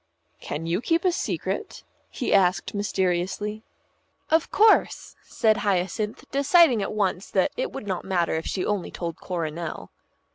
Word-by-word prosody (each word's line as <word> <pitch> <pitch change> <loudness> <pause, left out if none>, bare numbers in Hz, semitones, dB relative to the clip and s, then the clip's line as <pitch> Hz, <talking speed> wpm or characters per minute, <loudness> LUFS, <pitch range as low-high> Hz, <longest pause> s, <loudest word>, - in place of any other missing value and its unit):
"Can 155 +3 -5
you 170 +5 -1
keep 330 +6 +1
a 365 - +4
secret?" 345 - -3 0.3
he 250 - -2
asked 185 -2 +2
mysteriously. 200 +1 -1 0.7
"Of 320 0 +3
course," 430 +1 +3
said 220 -2 +1
Hyacinth, 200 +2 -1
deciding 280 - +5
at 195 - -3
once 200 -2 -1
that - - +1
it - - -2
would 270 - -7
not 190 -3 -3
matter 175 -3 0
if 160 0 -2
she 185 - -2
only 205 -3 -1
told 170 -2 -5
Coronel. 170 -2 -5
200 Hz, 145 wpm, -25 LUFS, 175-240 Hz, 0.7 s, deciding